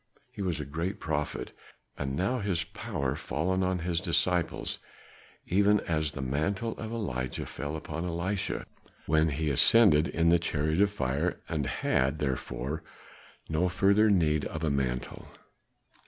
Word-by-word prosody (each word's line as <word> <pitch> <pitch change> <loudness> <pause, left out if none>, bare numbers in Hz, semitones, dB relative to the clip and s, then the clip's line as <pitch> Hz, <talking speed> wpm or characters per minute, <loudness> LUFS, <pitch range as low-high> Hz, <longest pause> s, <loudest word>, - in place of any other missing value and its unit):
He 115 -5 -7
was 90 -5 -1
a 75 - -3
great 85 +8 -3
prophet, 75 -2 -2 0.4
and 65 -1 -3
now 100 - 0
is 100 - -4
his 85 -4 +1
power 70 -4 -3
fallen 80 +5 -1
on 95 0 +1
his 85 -1 0
disciples, 85 0 0 0.7
even 100 +3 +4
as 80 -3 -1
the 70 - -4
mantle 85 - -1
of 110 0 -5
Elijah 65 - -3
fell 75 +4 -5
upon 80 +2 -4
Elisha 90 +3 -2 0.4
when 80 +1 +3
he 75 +1 -1
ascended 80 - +6
in 85 0 +2
the 85 0 +5
chariot 80 +1 0
of 100 - +5
fire 75 -2 -1
and 75 -5 -1
had, 70 +4 +1
therefore, 70 +1 -3 0.7
no 80 +3 +1
further 100 +4 +4
need 80 -6 +3
of 80 0 -5
a 75 - +1
mantle." 65 -3 -2
80 Hz, 150 wpm, -29 LUFS, 75-95 Hz, 0.7 s, ascended